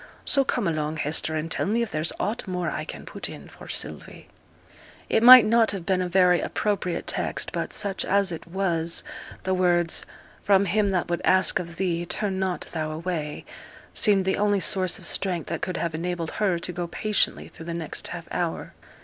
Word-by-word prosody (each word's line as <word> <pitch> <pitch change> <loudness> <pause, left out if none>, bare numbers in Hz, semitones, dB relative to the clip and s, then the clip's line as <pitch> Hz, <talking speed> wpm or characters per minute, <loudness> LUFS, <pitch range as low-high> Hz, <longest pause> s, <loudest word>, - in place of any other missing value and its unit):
So 275 - +4
come 245 -6 -1
along, 155 -1 -1
Hester, 155 +1 -1
and 155 +1 -3
tell 165 - 0
me 230 +3 +1
if 230 - -5
there's 155 +2 -1
aught 215 +1 -2
more 180 -2 -2
I - - -4
can - - -8
put - - -6
in - - -10
for - - -13
Sylvie.' - - -6 0.8
It - - +3
might 250 -1 +11
not 225 0 +4
have 185 -4 -5
been 185 -1 +1
a 180 - -2
very 180 -1 +4
appropriate 195 -4 -2
text, - - -2
but - - -3
such 195 -1 -2
as 200 -1 +2
it 165 - -7
was 170 -2 -1 0.4
the 190 - 0
words, 175 -2 +2 0.4
'From 200 -1 +4
him 205 +2 +1
that 185 -3 0
would 175 0 -2
ask 185 -3 +4
of 170 -1 -7
thee 175 -2 -1
turn 195 0 -1
not 185 -2 -1
thou 155 -2 -2
away,' 155 -1 -4 0.5
seemed 200 -3 +3
the 190 - +1
only 205 -1 +2
source 185 -1 +1
of - - -12
strength 180 -4 0
that 170 - -3
could 185 - -2
have 170 -2 -2
enabled 170 0 -3
her 195 -5 0
to 175 +1 -4
go 175 0 -3
patiently 210 +4 0
through 165 - -12
the 170 - -3
next 165 -3 -5
half - - -7
hour. - - -3
180 Hz, 200 wpm, -25 LUFS, 170-200 Hz, 0.8 s, might